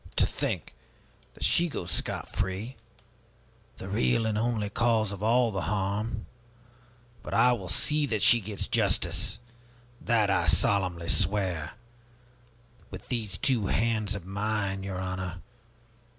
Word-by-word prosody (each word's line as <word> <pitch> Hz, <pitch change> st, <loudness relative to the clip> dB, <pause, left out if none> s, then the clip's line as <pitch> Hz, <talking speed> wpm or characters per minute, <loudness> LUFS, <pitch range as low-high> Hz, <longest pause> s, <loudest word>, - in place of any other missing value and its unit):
To -, -, +4 dB
think -, -, -3 dB, 0.6 s
that -, -, -7 dB
she 175 Hz, 0 st, +3 dB
goes 90 Hz, -, -5 dB
scot -, -, -2 dB
free, 100 Hz, +7 st, -3 dB, 1.0 s
the 95 Hz, -, -8 dB
real 115 Hz, +3 st, +1 dB
and 110 Hz, -1 st, 0 dB
only 110 Hz, -2 st, -1 dB
cause 110 Hz, -2 st, +2 dB
of 100 Hz, -1 st, -7 dB
all 115 Hz, +2 st, +3 dB
the 95 Hz, -2 st, -2 dB
harm! 105 Hz, +2 st, -2 dB, 1.0 s
But -, -, -5 dB
I 125 Hz, -, +5 dB
will 95 Hz, -7 st, -5 dB
see 150 Hz, -, +1 dB
that 110 Hz, -6 st, 0 dB
she 120 Hz, -, +7 dB
gets 100 Hz, 0 st, -3 dB
justice, -, -, +1 dB, 0.6 s
that 110 Hz, -4 st, +2 dB
I 85 Hz, -3 st, +2 dB
solemnly 90 Hz, -2 st, +2 dB
swear 90 Hz, -5 st, 0 dB, 1.2 s
with -, -, -10 dB
these 110 Hz, -7 st, -2 dB
two 120 Hz, -7 st, +1 dB
hands 110 Hz, -2 st, 0 dB
of 95 Hz, -4 st, -7 dB
mine, 100 Hz, 0 st, -2 dB
your 95 Hz, -1 st, -5 dB
honor! 95 Hz, -1 st, -4 dB
105 Hz, 135 wpm, -28 LUFS, 95-115 Hz, 1.2 s, she